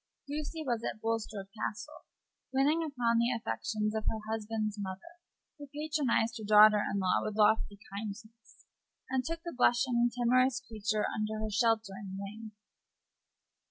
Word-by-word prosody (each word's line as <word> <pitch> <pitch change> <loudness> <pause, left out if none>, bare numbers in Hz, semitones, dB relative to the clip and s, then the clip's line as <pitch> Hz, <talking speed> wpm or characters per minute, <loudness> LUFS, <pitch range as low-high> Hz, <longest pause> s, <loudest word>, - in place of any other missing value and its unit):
Lucy 305 +2 -4
was 235 -3 -1
at 215 - -3
Bulstrode 220 -3 -3
Castle, 215 -1 -5 0.5
winning 280 +5 +3
upon 245 -6 +1
the 235 +1 +3
affections 215 -2 -2
of 220 -1 -2
her 220 - -2
husband's 215 -1 -2
mother, 200 - -7 0.4
who 290 - -8
patronized 285 -6 0
her - - -7
daughter 210 0 +7
in 200 - -1
law 185 -2 +2
with 215 - -3
lofty 210 -1 +3 0.2
kindness, 210 +1 -5 0.9
and 260 -1 +1
took 330 +4 -4
the 340 - -5
blushing, 240 -1 +3
timorous 250 +2 +2
creature 215 -4 -2
under 215 0 -2
her 215 0 -3
sheltering 205 -3 0
wing. 215 +2 -7
225 Hz, 140 wpm, -31 LUFS, 210-255 Hz, 0.9 s, daughter